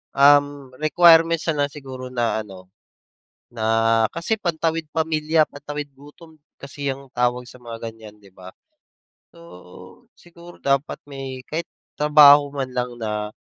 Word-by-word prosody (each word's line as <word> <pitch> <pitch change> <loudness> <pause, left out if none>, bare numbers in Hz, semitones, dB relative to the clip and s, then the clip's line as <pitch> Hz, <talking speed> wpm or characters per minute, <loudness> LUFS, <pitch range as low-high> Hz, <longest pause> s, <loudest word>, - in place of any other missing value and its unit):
um, 145 -1 +4
requirements 165 0 +5
na 145 -2 +1
lang - - -8
siguro 130 -3 -9
na 115 -2 -1
ano, 95 -2 -14 0.8
na 115 -2 -6 0.5
kasi 170 +7 -2
pantawid 165 -3 -2
pamilya, 155 -1 +1
pantawid 145 0 -7
gutom 155 +3 -16 0.2
kasi 140 +1 -5
ang 135 0 -14
tawag 125 0 -1
sa - - -14
mga 115 -1 -7
ganyan, 110 -2 -14
'di 100 - -18
ba? 95 0 -13 0.8
So, 90 - -15
siguro 175 0 -16
dapat 140 +1 0
may 135 -2 -8
kahit 165 +2 -4 0.3
trabaho 145 -1 +6
man 135 -2 -4
lang 125 0 -3
na 105 -1 -3
145 Hz, 135 wpm, -22 LUFS, 125-160 Hz, 0.8 s, trabaho